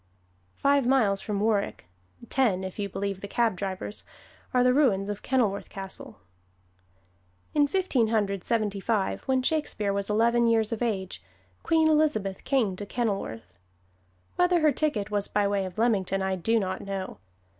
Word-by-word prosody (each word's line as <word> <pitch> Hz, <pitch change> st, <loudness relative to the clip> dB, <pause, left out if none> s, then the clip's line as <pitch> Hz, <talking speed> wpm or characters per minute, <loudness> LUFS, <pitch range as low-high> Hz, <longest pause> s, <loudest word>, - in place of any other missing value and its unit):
Five 280 Hz, -2 st, +2 dB
miles 220 Hz, -7 st, +3 dB
from 205 Hz, -2 st, -3 dB
Warwick 210 Hz, -, 0 dB, 0.4 s
(ten, 215 Hz, -9 st, +1 dB
if 190 Hz, +2 st, -7 dB
you 200 Hz, -1 st, -2 dB
believe 195 Hz, 0 st, -3 dB
the 200 Hz, -, -6 dB
cab 230 Hz, -1 st, +1 dB
drivers) 190 Hz, +2 st, -5 dB, 0.5 s
are 250 Hz, -1 st, +3 dB
the 250 Hz, 0 st, +4 dB
ruins 210 Hz, -9 st, +2 dB
of 205 Hz, -1 st, -4 dB
Kenilworth 220 Hz, -7 st, 0 dB
Castle. 195 Hz, -1 st, -9 dB, 1.4 s
In 290 Hz, -1 st, +4 dB
Fifteen 290 Hz, -9 st, +1 dB
Hundred 200 Hz, -4 st, 0 dB
Seventy 215 Hz, -4 st, 0 dB
five, 205 Hz, -1 st, -1 dB
when 260 Hz, -1 st, +2 dB
Shakespeare 255 Hz, -9 st, 0 dB
was 200 Hz, 0 st, -2 dB
eleven 235 Hz, +2 st, +3 dB
years 225 Hz, -1 st, +2 dB
of 230 Hz, -, -3 dB
age, 195 Hz, -6 st, -2 dB, 0.4 s
Queen 320 Hz, -1 st, +3 dB
Elizabeth 290 Hz, -12 st, +1 dB
came 240 Hz, -9 st, +1 dB
to 205 Hz, -, -5 dB
Kenilworth. 195 Hz, -, -3 dB, 0.8 s
Whether 355 Hz, -1 st, +3 dB
her 305 Hz, -1 st, +5 dB
ticket 245 Hz, -8 st, -1 dB
was 205 Hz, -1 st, 0 dB
by 205 Hz, -1 st, +1 dB
way 200 Hz, -1 st, 0 dB
of 185 Hz, +1 st, -8 dB
Leamington 195 Hz, -4 st, +1 dB
I 190 Hz, 0 st, 0 dB
do 225 Hz, +6 st, +1 dB
not 185 Hz, -2 st, -3 dB
know. 195 Hz, -, -5 dB
210 Hz, 155 wpm, -27 LUFS, 195-250 Hz, 1.4 s, her